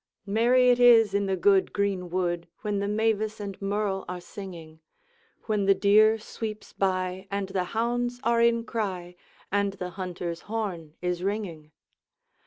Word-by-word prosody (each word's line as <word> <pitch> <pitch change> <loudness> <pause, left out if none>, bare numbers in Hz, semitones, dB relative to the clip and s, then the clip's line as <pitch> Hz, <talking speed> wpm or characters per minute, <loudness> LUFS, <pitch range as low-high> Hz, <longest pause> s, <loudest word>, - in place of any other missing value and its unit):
Merry 245 +5 +4
it 245 - +2
is 230 -4 +6
in 200 0 +1
the 190 - +1
good 190 +1 +3
greenwood, 180 -3 -1
When 210 -2 -1
the 200 - -1
mavis 215 0 0
and 200 -2 -6
merle 200 -1 -1
are 180 0 -4
singing, 170 -4 -10 0.6
When 210 -3 0
the 195 0 +5
deer 215 +3 +5
sweeps 215 0 -7
by, 185 0 -1
and 200 -1 -3
the 190 -2 -1
hounds 240 +4 -1
are 235 0 +3
in 235 0 +3
cry, 185 -6 -4 0.4
And 200 0 +1
the 180 -2 -6
hunter's 175 -2 -5
horn 180 -9 -4
is 180 -1 -1
ringing. 185 -6 -4
200 Hz, 150 wpm, -27 LUFS, 180-220 Hz, 0.6 s, is